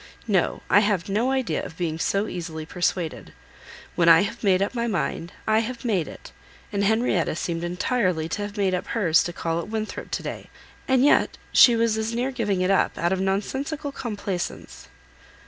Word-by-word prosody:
No, 195 -5 +1
I 205 - +6
have 205 -3 0
no 220 +6 +1
idea 265 -2 -1
of 160 - -9
being 165 -2 -2
so 200 +4 +1
easily 165 -4 -5
persuaded. 175 -1 -2 0.6
When 170 -1 +3
I 165 0 +8
have 230 +4 -5
made 190 -3 +4
up 200 - -3
my 235 -1 -1
mind, 175 -4 -2
I 220 0 +3
have 235 +2 -4
made 190 -9 +1
it; - - -11 0.4
and 200 0 0
Henrietta 210 -6 +1
seemed 170 0 -3
entirely 180 -2 0
to 205 - -3
have 205 0 -5
made 195 -2 +1
up 180 - -2
hers 180 -8 +3
to 175 - -3
call 165 -1 -2
at 170 - -5
Winthrop 220 -1 -4
to - - -3
day; - - -6 0.4
and 260 0 +4
yet, 290 - +3
she 240 -3 +7
was 225 -1 +1
as 220 +1 -2
near 250 +3 -1
giving 210 -7 -1
it 185 +1 +2
up, 195 - +2
out 175 +2 +1
of 190 - -1
nonsensical 270 +10 -2
complaisance!" 205 -8 -5
200 Hz, 190 wpm, -24 LUFS, 175-230 Hz, 0.6 s, I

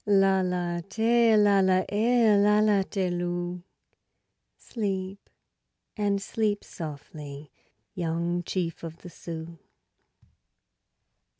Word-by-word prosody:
Lala, 185 -3 +2
Tee, 230 0 +3
Lala, 195 -3 +4
Eh, 225 +1 +3
Lala, 210 0 +4
Tee, 190 -2 -2
Lou; 175 0 -3 1.0
Sleep 195 -3 -4 0.7
and 205 -2 0
sleep 205 0 -1
softly, 150 -2 -9 0.4
Young 170 0 -1
chief 175 -2 -3
of 165 -1 -9
the 175 - -9
Sioux. 165 0 -8
190 Hz, 85 wpm, -27 LUFS, 175-205 Hz, 1.0 s, Lala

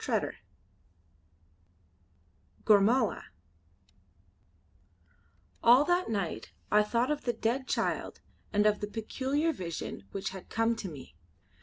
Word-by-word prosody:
CHAPTER - - 0
II - - -19 2.3
GORMALA 215 +4 +4 2.4
All 250 +5 +7
that 355 -2 +1
night 200 -7 -3 0.2
I 210 - +6
thought 235 +5 +1
of 295 - -3
the 240 - +1
dead 235 +4 -1
child - - -1 0.3
and 205 0 +2
of 210 -1 +3
the 205 - -3
peculiar 265 +9 -1
vision 170 - -6
which 195 - -3
had 190 -1 -10
come 225 +1 +1
to 195 - -5
me. 140 -5 -11
225 Hz, 115 wpm, -30 LUFS, 205-260 Hz, 2.4 s, All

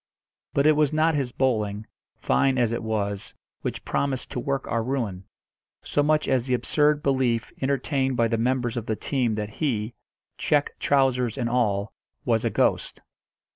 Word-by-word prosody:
But 140 - +3
it 155 - +7
was 150 -2 +2
not 155 +1 +2
his 135 -4 -1
bowling, 110 -5 0 0.3
fine 130 - +2
as 120 -3 +2
it 115 - -2
was, 100 -3 -3 0.3
which - - -4
promised 135 -2 -2
to - - -3
work 135 +2 -2
our 115 -1 0
ruin, 110 -7 -3 0.6
so 145 - +1
much 150 +1 +2
as 130 -2 +1
the 125 - +2
absurd 150 +3 +2
belief 130 -4 +1
entertained 135 -1 0
by 115 - +3
the 115 0 0
members 125 0 0
of 115 - -4
the 110 - 0
team 120 -2 -1
that 105 -1 -3
he 115 -3 -2 0.5
check 145 -1 +2
trousers 130 -4 +2
and 120 -3 -1
all 105 -4 0 0.3
was 115 -3 +2
a - - +1
ghost. - - 0
125 Hz, 170 wpm, -25 LUFS, 110-140 Hz, 0.6 s, it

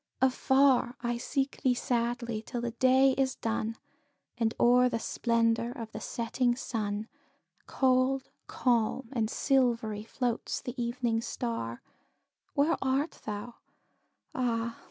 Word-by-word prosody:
Afar 265 -1 +3
I 240 0 -1
seek 275 +2 -2
thee 255 -2 +3
sadly, 235 -2 -1
till 240 +2 -5
the 240 0 -2
day 260 +3 +4
is 265 -1 +1
done, 225 0 -2 0.6
And 230 -1 0
o'er 250 +1 +5
the 230 - -1
splendour 230 0 +1
of 230 -4 -7
the - - -6
setting 240 +1 0
sun, 215 -3 -3 0.6
Cold, 260 0 +2 0.2
calm, 240 0 0
and 225 -4 0
silvery, 235 -7 +1
floats 240 +1 -2
the 245 - -6
evening 235 -1 0
star; 230 - -4 0.7
Where 300 +3 +3
art 270 +4 0
thou? 215 +3 -5 0.8
Ah! 235 -2 -1
240 Hz, 120 wpm, -30 LUFS, 230-260 Hz, 0.8 s, o'er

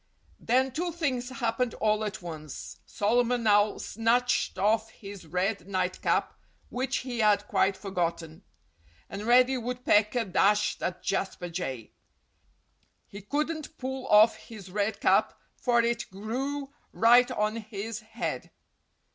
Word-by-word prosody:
Then 260 +3 +1
two 345 +6 -2
things 265 -7 -2
happened 240 -2 -1
all 215 0 +1
at 205 -3 -5
once. 155 -4 -8
Solomon 240 +3 +1
Owl 205 0 +4
snatched 230 0 0
off 220 +3 +1
his 200 -5 -11
red 185 +2 -1
night 185 -2 -2
cap—which 260 +1 -2
he 245 -2 -4
had 210 -1 +3
quite 190 0 +1
forgotten. 170 -4 -3 0.7
And 205 +3 -5
Reddy 255 +2 +5
Woodpecker 235 -2 +1
dashed 205 +2 +2
at 180 - -3
Jasper 190 -2 -2
Jay. 135 -10 -5 1.2
He 200 - -9
couldn't 305 - -3
pull 265 0 -5
off 215 +2 +6
his 200 -5 -12
red 205 +1 -1
cap, - - +3 0.2
for 240 -2 +2
it 235 0 -1
grew 270 +8 -4 0.2
right 240 +2 +5
on 215 -2 -1
his 220 0 -6
head. 220 0 -5
220 Hz, 125 wpm, -28 LUFS, 200-245 Hz, 1.2 s, off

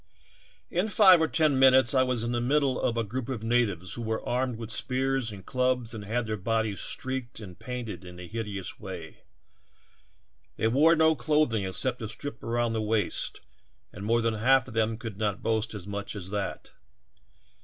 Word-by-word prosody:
"In 180 +5 +1
five 190 -5 +7
or 160 - +3
ten 155 -4 +2
minutes 130 0 +6
I 130 - +4
was 125 -3 +1
in 120 - -1
the 120 -1 0
middle 135 +1 +1
of 115 - 0
a 115 - +1
group 120 +4 -4
of 120 -5 -4
natives 105 -7 0
who 120 - -6
were 110 -1 -3
armed 125 0 0
with 115 -1 -7
spears 130 -1 -1
and 95 -3 -10
clubs 125 -2 0
and 105 -2 -7
had 115 +3 -1
their 110 0 -2
bodies 110 0 0
streaked 130 -2 -4
and 95 -5 -10
painted 120 -8 -6
in 90 -1 -11
a 90 - -7
hideous 105 -3 -5
way. 90 -5 -8 1.4
They 110 - +2
wore 155 +7 +5
no 160 0 +4
clothing 135 -6 +1
except 125 +7 -2
a 110 - -4
strip 120 +2 -6
around 120 0 0
the 110 - -1
waist 105 -3 -1 0.5
and 100 - -8
more 115 +3 +2
than 115 0 +1
half 130 +4 +3
of 125 - -9
them 110 0 +1
could 110 -4 -7
not 105 -2 -1
boast 110 0 0
as 100 -4 -7
much 100 +1 -5
as 95 -2 -7
that. 105 -1 -4
115 Hz, 190 wpm, -28 LUFS, 105-130 Hz, 1.4 s, five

